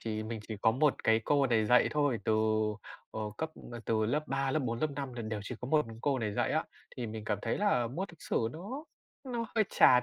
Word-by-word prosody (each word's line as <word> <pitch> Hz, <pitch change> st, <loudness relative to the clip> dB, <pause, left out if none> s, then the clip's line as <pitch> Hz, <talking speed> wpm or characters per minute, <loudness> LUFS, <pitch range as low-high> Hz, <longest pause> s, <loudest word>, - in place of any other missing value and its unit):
chỉ 110 Hz, -1 st, -3 dB
mình 110 Hz, 0 st, -4 dB
chỉ 110 Hz, -, -3 dB
có 110 Hz, -, +6 dB
một 140 Hz, +5 st, +1 dB
cái 110 Hz, 0 st, +5 dB
cô 140 Hz, -2 st, +3 dB
này 110 Hz, -3 st, +2 dB
dạy 125 Hz, +2 st, +5 dB
thôi, 145 Hz, -5 st, +2 dB
từ, 110 Hz, -, +2 dB, 0.8 s
ờ, -, -, -5 dB, 0.2 s
cấp 160 Hz, 0 st, -2 dB, 0.3 s
từ 110 Hz, -1 st, +1 dB
lớp 150 Hz, +6 st, 0 dB
3, 135 Hz, 0 st, 0 dB
lớp 155 Hz, -, +2 dB
4, 115 Hz, -5 st, -2 dB
lớp 155 Hz, -, +1 dB
5 140 Hz, -2 st, -4 dB
là 120 Hz, -1 st, -5 dB
đều 110 Hz, -1 st, -3 dB
chỉ 105 Hz, -, -5 dB
có 125 Hz, -, -5 dB
một 150 Hz, -1 st, +3 dB
mình 115 Hz, 0 st, -9 dB
cô 140 Hz, -2 st, +2 dB
này 110 Hz, -3 st, -1 dB
dạy -, -, +1 dB
á. -, -, +1 dB, 0.3 s
Thì 125 Hz, -, -3 dB
mình 110 Hz, -1 st, -6 dB
cảm 105 Hz, -2 st, 0 dB
thấy -, -, 0 dB
là 200 Hz, -, +3 dB
môn 165 Hz, +12 st, -3 dB
lịch 170 Hz, -, -16 dB
sử 115 Hz, -, 0 dB
nó 225 Hz, -, -6 dB, 0.4 s
nó 240 Hz, -3 st, -2 dB
hơi 220 Hz, -2 st, +4 dB
chán, 125 Hz, -1 st, +7 dB
125 Hz, 250 wpm, -32 LUFS, 110-150 Hz, 0.8 s, chán